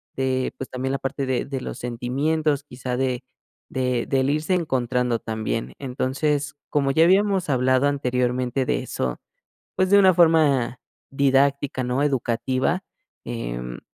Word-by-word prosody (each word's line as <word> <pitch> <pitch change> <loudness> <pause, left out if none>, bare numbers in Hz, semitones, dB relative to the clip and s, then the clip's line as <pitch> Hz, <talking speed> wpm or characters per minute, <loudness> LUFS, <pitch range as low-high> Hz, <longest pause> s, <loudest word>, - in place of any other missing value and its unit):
de, 130 -1 -1
pues, 135 - -6
también 130 +1 -3
la 135 - -1
parte 135 0 -3
de 130 -2 0
de 135 -2 -4
los - - -6
sentimientos, 140 +5 -1
quizá 125 -2 -5
de 130 -1 -1 0.5
de 125 -2 -1
del 135 0 +1
irse 155 +4 0
encontrando 125 -6 0
también. 110 +1 -3
Entonces, 140 +3 -1
como 140 -2 +1
ya 160 +4 +4
habíamos 190 -2 +3
hablado 130 +1 +3
anteriormente 125 -1 0
de - - 0
eso, 65 -1 -3 0.6
pues, 185 0 +2
de 200 - +8
una 190 -2 +6
forma 155 -8 +3 0.3
didáctica, 140 0 +2
¿no?, 125 +3 0
educativa, 130 +5 0 0.4
em, - - -5
130 Hz, 140 wpm, -23 LUFS, 125-145 Hz, 0.6 s, de